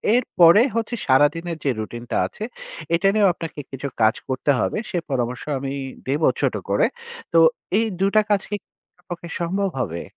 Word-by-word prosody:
এরপরে 195 -6 +5
হচ্ছে 230 +1 -1
সারাদিনের 160 +5 +2
যে - - +3
রুটিনটা 120 +2 -4
আছে, - - -9 0.5
এটা 180 +4 +2
নিয়েও 205 -3 +4
আপনাকে 165 -3 -7
কিছু 135 +1 -5
কাজ 110 0 +4
করতে 130 +2 +1
হবে। - - 0
সে 180 - -2
পরামর্শ 125 -1 -2 0.2
আমি 135 0 -4 0.3
দেব 140 +4 0 0.2
ছোট - - +1
করে। - - +3 0.5
তো 165 - +6 0.4
এই 225 - +3
২টা 200 +3 +4
কাজ 200 -2 +3
কি 205 - -1
করা - - -75 0.2
আপনার 180 - -34
পক্ষে 175 -1 -6
সম্ভব 190 +3 0
হবে? 85 -7 -3
165 Hz, 170 wpm, -22 LUFS, 130-195 Hz, 0.5 s, তো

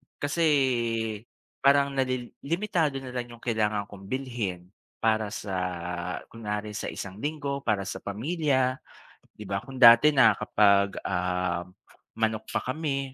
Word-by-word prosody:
Kasi 145 +4 -2 1.2
parang 140 0 +4
na 135 -1 0
li 125 -2 -3
limitado 165 -3 0
na 125 - -7
lang 120 -1 -4
yung 115 - -22
kailangan 105 -3 0
kong 100 -1 -12
bilhin 115 -9 -3 0.4
para 110 -1 +2
sa 100 -2 -5 0.8
kunwari 105 -2 -4
sa 110 - -4
isang 95 +1 -7
linggo 145 -2 -2
para 105 -5 0
sa - - -5
pamilya, 130 - 0 0.6
di 105 - -9
ba? 100 +1 -2
Kung 135 -1 -10
dati 120 +4 +9
na 115 -5 +7
kapag, 100 -1 +3
ah, 90 -1 -1 0.5
manok 110 -1 -1
pa - - -2
kami 135 -1 -2
115 Hz, 135 wpm, -27 LUFS, 100-140 Hz, 1.2 s, dati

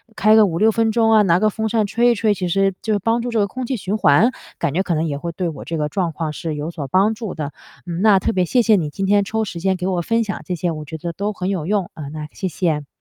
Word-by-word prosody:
开 215 +2 +4
个 220 -1 +7
5-6 200 +5 +2
分 225 0 +1
钟 225 0 +3
啊， 215 -1 +6
拿 175 -2 +3
个 215 0 +3
风 220 +1 -2
扇 220 -1 +1
吹 235 +3 +3
一 - - +1
吹， 210 0 +2
其 185 -2 -3
实 195 +2 +2
就 215 -2 0
帮 230 +4 +1
助 245 - -3
这 225 - +1
个 200 - +2
空 255 +4 -5
气 260 - -2
循 200 +2 -2
环， 200 - +4 0.3
感 165 -5 -1
觉 190 +4 +1
可 175 - -1
能 160 +1 0
也 145 -3 -2
会 170 +3 -5
对 180 +1 -3
我 155 - -8
这 165 - -3
个 150 -1 0
状 175 -1 -1
况 155 -1 -4
是 160 -1 -4
有 150 +3 -4
所 145 -5 -6
帮 195 +9 +3
助 220 -3 -6
的。 145 -3 -4 0.3
嗯， 175 0 -4
那 210 -2 +5
特 205 - 0
别 185 -1 +1
谢 245 +7 +2
谢 220 -2 +4
你， 160 -6 0
今 195 +6 -3
天 205 +1 +3
抽 220 +2 -2
时 180 -4 -6
间 190 +2 +1
给 180 +1 -3
我 180 -2 0
分 230 +6 +1
享 210 -2 -5
这 180 - -2
些， 175 0 -1
我 155 -1 -6
觉 160 +2 -7
得 170 +2 -4
都 205 +4 -3
很 185 0 -3
有 175 -6 -2
用， 200 -2 0
啊， 150 -3 -8
那 150 -1 -6
谢 190 - -3
谢。 155 -4 -1
190 Hz, 325 characters per minute, -20 LUFS, 165-215 Hz, 0.3 s, 个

